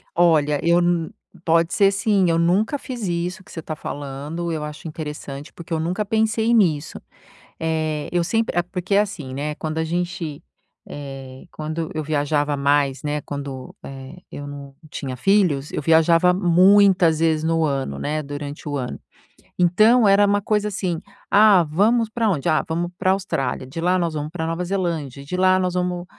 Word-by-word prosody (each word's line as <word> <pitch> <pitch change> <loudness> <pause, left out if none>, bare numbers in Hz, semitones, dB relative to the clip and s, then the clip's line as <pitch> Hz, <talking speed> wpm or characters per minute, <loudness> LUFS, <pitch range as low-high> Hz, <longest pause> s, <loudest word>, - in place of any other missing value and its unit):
Olha, 155 -4 +3
eu 170 +1 +4
n 175 -2 0 0.3
pode 165 0 +2
ser 195 -2 +4
sim, 195 -2 +2
eu 165 - +2
nunca 190 - +2
fiz 240 -6 -5
isso 175 +2 -3
que - - -17
você 165 - -6
tá 155 - -5
falando, 145 +4 -5
eu 155 -2 -3
acho 150 +2 -7
interessante, 150 -2 -7
porque 170 0 -12
eu 160 - 0
nunca 180 +6 -1
pensei 220 +2 +1
nisso, 165 -9 +1 0.6
eh, 155 -2 -2
eu 175 -1 +1
sempre 225 0 -1
é 175 - +5
porque, 180 +2 -3
assim, 195 -10 -1
né, 145 +3 -3
quando 155 0 -4
a 160 - +1
gente 170 -2 -3 0.5
eh, 135 -2 -9
quando 155 +1 -4
eu 155 - -2
viajava 145 -1 0
mais, 140 -1 +1
né, 150 0 -1
quando, 140 -3 -7
eh, 135 +4 -9
eu 145 - -7
não 140 -1 -9 0.2
tinha 130 -3 -5
filhos, 175 -5 +2
eu - - -2
viajava 165 +3 +4
muitas 185 -2 +5
vezes 160 -1 +1
no 165 0 +1
ano, 135 - -2
né, 155 +1 -2
durante 145 +1 -7
o 145 - -2
ano, 125 -2 -4 0.6
então 215 +7 +4
era 200 +1 +5
uma 205 0 +2
coisa 210 +1 0
assim: 180 -4 -2 0.3
"Ah, 205 -3 +6
vamos 215 +9 +2
pra 225 0 -1
onde? 150 -8 0
Ah, 155 - +2
vamos 170 +2 -2
pra 185 +1 +2
Austrália, 135 -10 -2
de 150 +5 -7
lá 180 +1 +2
nós 170 -2 -1
vamos 150 0 -4
pra 160 -2 -3
Nova 165 +2 -2
Zelândia, 165 -8 -3
de 180 +6 -4
lá 185 0 +4
nós 180 -1 -1
vamos", 180 -1 -2
165 Hz, 180 wpm, -22 LUFS, 145-185 Hz, 0.6 s, Ah